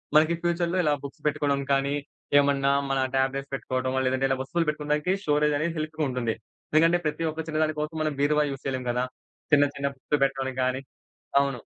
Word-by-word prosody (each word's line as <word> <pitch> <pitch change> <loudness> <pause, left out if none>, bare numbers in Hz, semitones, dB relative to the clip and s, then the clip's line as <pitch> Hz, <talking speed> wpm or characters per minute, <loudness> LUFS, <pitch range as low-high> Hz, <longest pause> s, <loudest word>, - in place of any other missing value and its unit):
మనకి 155 +2 +6
ఫ్యూచర్‌లో 175 +1 +1
ఇలా 150 -2 +3
బుక్స్ 140 - -10
పెట్టుకోవడం 140 -1 +1
కానీ, 140 +1 +1 0.4
ఏమన్నా 140 -1 +3 0.2
మన 135 0 +1 0.2
ట్యాబ్లెట్స్ 135 +1 0
పెట్టుకోవడమో, 130 -1 -1
లేదంటే 130 +1 +1
ఇలా 135 - +1
వస్తువులు 165 +6 -1
పెట్టుకోవడానికి 150 +2 0
స్టోరేజ్ 150 -1 +2
అనేది 165 +3 -1
హెల్ప్‌గా 155 0 -2
ఉంటుంది. 125 -3 -1 0.4
ఎందుకంటే, 165 +3 +5
ప్రతి 160 +2 0
ఒక్క 160 +1 -4
చిన్న 155 0 -1
దాని 155 -1 -1
కోసం 155 +2 -4
మనం 155 -1 0
బీరువా 150 +1 +3
యూజ్ 135 -1 -7
చేయలేం 130 -2 -2
గదా! 125 +1 0 0.5
చిన్న 145 -1 +7
చిన్న 140 0 -1
బుక్స్ 140 +2 -1
పెట్టడానికి 135 -1 -1
గానీ. 130 +1 0 0.6
అవును. 140 -3 -1
145 Hz, 180 wpm, -26 LUFS, 135-155 Hz, 0.6 s, చిన్న